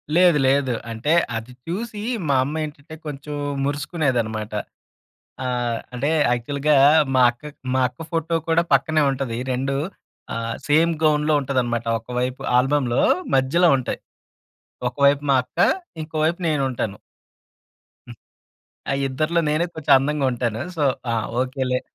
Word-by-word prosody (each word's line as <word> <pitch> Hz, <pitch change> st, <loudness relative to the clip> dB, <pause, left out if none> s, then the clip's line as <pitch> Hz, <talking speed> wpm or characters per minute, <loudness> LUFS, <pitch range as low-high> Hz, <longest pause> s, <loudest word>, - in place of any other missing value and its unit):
లేదు 175 Hz, -3 st, +6 dB
లేదు. 135 Hz, -2 st, +2 dB, 0.2 s
అంటే 115 Hz, +8 st, 0 dB, 0.2 s
అది 115 Hz, +3 st, -8 dB
చూసి 210 Hz, +4 st, -4 dB, 0.3 s
మా 140 Hz, -, +3 dB
అమ్మ 150 Hz, +4 st, -3 dB
ఏంటంటే 150 Hz, +1 st, -10 dB
కొంచెం 145 Hz, 0 st, -6 dB, 0.3 s
మురుసుకునేదన్నమాట. 130 Hz, -8 st, -1 dB, 0.9 s
ఆహ్, 120 Hz, -2 st, -1 dB, 0.2 s
అంటే 135 Hz, +5 st, -1 dB, 0.2 s
యాక్చువల్‌గా 140 Hz, +5 st, +1 dB, 0.4 s
మా 130 Hz, -, +5 dB
అక్క 150 Hz, +5 st, -11 dB, 0.2 s
మా 130 Hz, -, +2 dB
అక్క 125 Hz, -, -32 dB
ఫోటో 165 Hz, 0 st, -1 dB
కూడా 165 Hz, +1 st, +4 dB
పక్కనే 155 Hz, +3 st, +3 dB
ఉంటది. 130 Hz, -4 st, -3 dB
2 135 Hz, +2 st, -1 dB, 0.6 s
ఆహ్, 115 Hz, 0 st, -3 dB
సేమ్ 160 Hz, +3 st, +4 dB
గౌన్‌లో 150 Hz, 0 st, +3 dB
ఉంటదన్నమాట. 125 Hz, -4 st, -1 dB
ఒక 115 Hz, -, -25 dB
వైపు 125 Hz, +1 st, -2 dB, 0.2 s
ఆల్బమ్‌లో 130 Hz, -2 st, +2 dB, 0.3 s
మధ్యలో 145 Hz, +7 st, +3 dB
ఉంటాయి. 130 Hz, -, -4 dB, 0.9 s
ఒకవైపు 140 Hz, +2 st, +3 dB
మా 135 Hz, -, +5 dB
అక్క, -, -, -19 dB, 0.4 s
ఇంకో 155 Hz, +1 st, -8 dB
వైపు 170 Hz, +3 st, 0 dB
నేనుంటాను. 130 Hz, -8 st, -1 dB, 1.1 s
హ్మ్. -, -, -10 dB, 0.7 s
ఆ -, -, +1 dB, 0.2 s
ఇద్దరిలో 155 Hz, +6 st, 0 dB
నేనే 155 Hz, +3 st, +1 dB
కొంచెం 160 Hz, -3 st, +3 dB
అందంగా 145 Hz, +1 st, 0 dB
ఉంటాను. 115 Hz, -2 st, -2 dB, 0.2 s
సో, 150 Hz, -, +1 dB, 0.3 s
ఆ! -, -, +1 dB, 0.3 s
ఓకే 130 Hz, +1 st, -2 dB
లే. 125 Hz, -, +2 dB
140 Hz, 130 wpm, -22 LUFS, 125-155 Hz, 1.1 s, లేదు